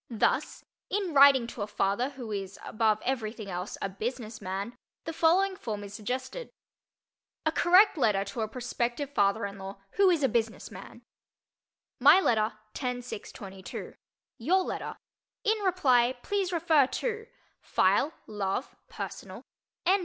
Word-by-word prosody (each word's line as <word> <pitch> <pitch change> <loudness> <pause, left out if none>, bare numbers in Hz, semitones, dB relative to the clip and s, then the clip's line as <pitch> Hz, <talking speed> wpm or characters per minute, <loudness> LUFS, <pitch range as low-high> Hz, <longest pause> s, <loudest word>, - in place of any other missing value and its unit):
Thus, 230 -3 0 0.2
in 385 -4 -1
writing 275 -3 +7
to 230 -1 -7
a 205 - -2
father 210 +5 0
who 255 -5 -8
is 195 -1 -4
above 215 -1 +1
everything 220 -5 -3
else 180 +2 -4
a - - +1
"business 225 +3 -5
man," 195 +5 -4 0.3
the 325 - -4
following 370 +5 +3
form 215 - -5
is 200 0 -9
suggested: 255 - -4 1.0
A 315 - +3
Correct 360 +2 +5
Letter 200 -5 +2
to 200 +3 -5
a 220 - 0
Prospective 245 +3 -3
Father 200 0 +2
in 200 0 -7
Law 195 +1 -7 0.2
Who 395 -1 +6
Is 335 -5 +2
a - - +5
Business 225 -1 -1
Man - - -11 1.0
My 290 +8 +8
letter, 220 - +2 0.2
10 250 -2 -3
6 240 - -7
22 190 -2 -8 0.5
Your 365 +11 +3
letter, - - -4 0.5
In 435 -1 +2
reply 260 -11 +3
please 395 -3 -1
refer 320 -5 +4
to: 450 - -3 0.2
———— - - -40
File—Love—personal— 210 -7 -1 0.4
N. 380 +3 +4
245 Hz, 145 wpm, -29 LUFS, 210-325 Hz, 1.0 s, My